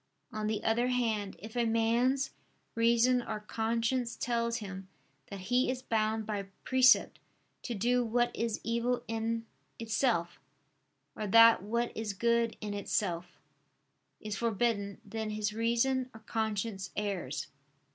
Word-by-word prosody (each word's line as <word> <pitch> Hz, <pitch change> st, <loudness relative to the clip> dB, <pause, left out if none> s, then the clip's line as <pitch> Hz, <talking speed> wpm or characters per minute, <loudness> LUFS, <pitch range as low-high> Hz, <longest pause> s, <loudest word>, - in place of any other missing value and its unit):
On 215 Hz, 0 st, -2 dB
the 215 Hz, 0 st, -2 dB
other 235 Hz, +2 st, +2 dB
hand 225 Hz, -5 st, 0 dB
if 220 Hz, +6 st, -10 dB
a 240 Hz, -, +2 dB
man's 235 Hz, +4 st, +2 dB, 0.4 s
reason 235 Hz, +2 st, +3 dB
or 215 Hz, -, -4 dB
conscience 230 Hz, +3 st, -1 dB
tells 235 Hz, -1 st, -1 dB
him 195 Hz, -2 st, -7 dB, 0.4 s
that 200 Hz, -1 st, -7 dB
he 245 Hz, +7 st, +1 dB
is 255 Hz, 0 st, -3 dB
bound 220 Hz, 0 st, 0 dB
by 205 Hz, -2 st, -3 dB, 0.2 s
precept 260 Hz, 0 st, +4 dB, 0.4 s
to 240 Hz, -, -4 dB
do 245 Hz, +4 st, +2 dB
what 240 Hz, +1 st, +1 dB
is 230 Hz, -2 st, -1 dB
evil 235 Hz, +2 st, 0 dB
in 225 Hz, 0 st, -2 dB, 0.3 s
itself; 220 Hz, -6 st, 0 dB, 0.8 s
or 215 Hz, -, -3 dB
that 230 Hz, +1 st, +7 dB
what 235 Hz, +4 st, -2 dB
is 220 Hz, -2 st, -3 dB
good 235 Hz, +2 st, +1 dB
in 210 Hz, -1 st, -4 dB
itself, 180 Hz, -3 st, -2 dB, 0.8 s
is 210 Hz, -1 st, -4 dB
forbidden, 210 Hz, -2 st, 0 dB
then 220 Hz, -1 st, -4 dB
his 210 Hz, 0 st, -2 dB
reason 235 Hz, +3 st, +1 dB
or 220 Hz, -, -11 dB
conscience 215 Hz, -3 st, -2 dB
errs. 190 Hz, -10 st, -3 dB
225 Hz, 135 wpm, -31 LUFS, 210-235 Hz, 0.8 s, that